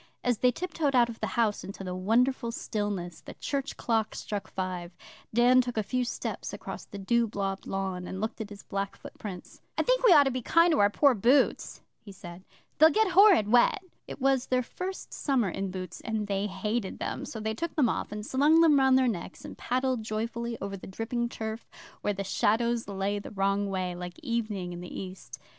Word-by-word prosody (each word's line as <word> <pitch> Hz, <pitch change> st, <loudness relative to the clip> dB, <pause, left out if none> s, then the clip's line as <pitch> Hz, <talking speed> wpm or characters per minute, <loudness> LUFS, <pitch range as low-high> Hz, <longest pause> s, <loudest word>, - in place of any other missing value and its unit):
As 245 Hz, -3 st, +1 dB
they 250 Hz, -, +5 dB
tiptoed 315 Hz, 0 st, -1 dB
out 240 Hz, -1 st, +5 dB
of 230 Hz, -, -8 dB
the 215 Hz, -, -1 dB
house 220 Hz, -3 st, +1 dB
into 195 Hz, 0 st, -8 dB
the 180 Hz, -1 st, -4 dB
wonderful 230 Hz, +6 st, +1 dB
stillness, 205 Hz, -7 st, -3 dB
the -, -, -10 dB
church 280 Hz, -1 st, -3 dB
clock 225 Hz, -2 st, 0 dB
struck 205 Hz, -2 st, -4 dB
five. 180 Hz, -2 st, -5 dB, 0.3 s
Dan 245 Hz, +3 st, +5 dB
took 245 Hz, -2 st, -5 dB
a 215 Hz, -, +2 dB
few 250 Hz, +4 st, -1 dB
steps 235 Hz, -, -4 dB
across -, -, -7 dB
the 200 Hz, -, -9 dB
dew 235 Hz, +4 st, +1 dB
blobbed 195 Hz, -2 st, -3 dB
lawn, 190 Hz, -2 st, -3 dB
and 190 Hz, -, -5 dB
looked 220 Hz, +2 st, -3 dB
at 210 Hz, -, -6 dB
his 205 Hz, -1 st, -11 dB
black 195 Hz, 0 st, -3 dB
footprints. 185 Hz, -4 st, -9 dB, 0.2 s
'I -, -, +2 dB
think -, -, +2 dB
we 485 Hz, -, +7 dB
ought 295 Hz, -4 st, +8 dB
to 270 Hz, -, 0 dB
be 255 Hz, 0 st, -3 dB
kind 335 Hz, +7 st, +4 dB
to 310 Hz, -, +2 dB
our 205 Hz, -, +5 dB
poor 280 Hz, +6 st, +4 dB
boots,' 250 Hz, +6 st, +2 dB, 0.2 s
he 205 Hz, -, -12 dB
said. 180 Hz, -2 st, -11 dB, 0.4 s
'They'll 315 Hz, +1 st, +9 dB
get 435 Hz, +5 st, +2 dB
horrid 370 Hz, -, +6 dB
wet.' 245 Hz, -, +4 dB, 0.2 s
It -, -, -8 dB
was 270 Hz, -1 st, +2 dB
their 255 Hz, 0 st, +1 dB
first 370 Hz, +9 st, -6 dB
summer 255 Hz, -8 st, +1 dB
in 195 Hz, +2 st, -3 dB
boots, 185 Hz, -2 st, -7 dB
and 220 Hz, -2 st, -2 dB
they 200 Hz, 0 st, -1 dB
hated 210 Hz, +1 st, -3 dB
them, -, -, -4 dB
so 225 Hz, -, -6 dB
they 220 Hz, 0 st, -2 dB
took 335 Hz, +9 st, -4 dB
them 285 Hz, -6 st, +4 dB
off, -, -, -2 dB
and 210 Hz, 0 st, -5 dB
slung 295 Hz, +6 st, +4 dB
them 305 Hz, -4 st, +6 dB
round 265 Hz, -1 st, +5 dB
their 260 Hz, -1 st, +3 dB
necks, 190 Hz, -5 st, -4 dB
and -, -, -8 dB
paddled 255 Hz, -1 st, -1 dB
joyfully 230 Hz, +2 st, -3 dB
over 195 Hz, 0 st, -4 dB
the 190 Hz, -, -10 dB
dripping 235 Hz, +4 st, -2 dB
turf 220 Hz, 0 st, -6 dB, 0.3 s
where 205 Hz, -, 0 dB
the 195 Hz, 0 st, -4 dB
shadows 230 Hz, +4 st, +1 dB
lay 200 Hz, +1 st, -2 dB
the 200 Hz, -, -8 dB
wrong 200 Hz, 0 st, 0 dB
way, 185 Hz, -2 st, -2 dB
like 180 Hz, 0 st, -7 dB
evening 215 Hz, -8 st, -2 dB
in 175 Hz, -, -7 dB
the 180 Hz, -, -7 dB
East. 185 Hz, 0 st, -8 dB
220 Hz, 210 wpm, -28 LUFS, 195-255 Hz, 0.4 s, They'll